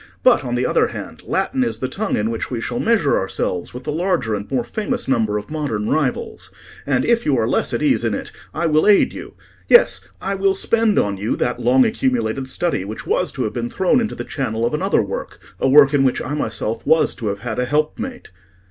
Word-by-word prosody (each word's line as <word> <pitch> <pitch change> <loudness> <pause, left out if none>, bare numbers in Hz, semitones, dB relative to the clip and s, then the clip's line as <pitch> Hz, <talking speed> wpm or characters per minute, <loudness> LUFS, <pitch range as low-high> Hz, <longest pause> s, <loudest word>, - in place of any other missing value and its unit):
But, - - +5
on - - -2
the - - 0
other - - +2
hand, - - -8
Latin 260 -1 0
is 235 - -2
the 130 - -2
tongue 205 +9 -2
in 105 +2 0
which 115 - -4
we 125 - -3
shall 240 - -3
measure 220 - +2
ourselves 90 -2 -3
with 125 +1 -8
the 150 - -3
larger 165 - 0
and 100 0 -4
more 130 -3 0
famous 210 - -3
number 110 -5 +1
of 105 +6 -7
modern 135 -9 -2
rivals. 145 -5 -2 0.4
And 135 -3 +1
if 235 0 +2
you 140 -3 +1
are 110 -1 +1
less - - 0
at - - -2
ease - - +2
in - - 0
it, - - -6 0.2
I 170 - -2
will 155 +1 +3
aid 205 -1 +5
you—yes, 480 +1 +1 0.2
I 195 - -3
will 195 0 +1
spend 225 +1 +1
on 100 -1 +1
you 105 +4 -1
that 125 0 -1
long 125 +2 +4
accumulated 230 - -1
study 170 - -1
which 105 +3 -7
was - - 0
to - - -2
have 105 - -3
been 120 0 -3
thrown 190 - +2
into 225 - -3
the - - -5
channel 115 -5 -2
of 120 - -1
another 185 - +1
work—a 100 +6 -4
work 140 +1 +7
in 140 -1 +3
which 130 -2 +1
I 145 - -4
myself 115 -6 -3
was 160 0 +3
to 115 - -5
have 100 0 -3
had 115 -2 -4
a 125 - +1
helpmate." 155 - -2
135 Hz, 225 wpm, -20 LUFS, -, 0.4 s, work